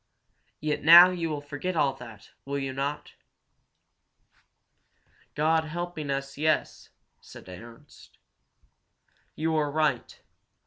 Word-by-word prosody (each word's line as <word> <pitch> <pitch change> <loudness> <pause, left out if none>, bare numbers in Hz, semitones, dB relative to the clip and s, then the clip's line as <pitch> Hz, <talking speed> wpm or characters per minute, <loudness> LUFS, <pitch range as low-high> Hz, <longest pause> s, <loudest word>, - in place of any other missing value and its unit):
"Yet 150 0 -2
now 170 +3 +9
you 170 -2 -3
will 150 -2 -4
forget 145 +5 -5
all 140 -4 +1
that, 115 -5 -13
will 140 +1 -4
you 135 -1 -4
not?" 140 +2 -5 2.2
"God 160 +2 +1
helping 170 -2 -6
us, 140 0 -4
yes!" 155 0 -1 0.3
said - - -15
Ernst. 115 +10 -14 1.2
"You 160 +1 -1
are 150 -2 0
right. 150 -4 -2
150 Hz, 105 wpm, -26 LUFS, 140-160 Hz, 2.2 s, now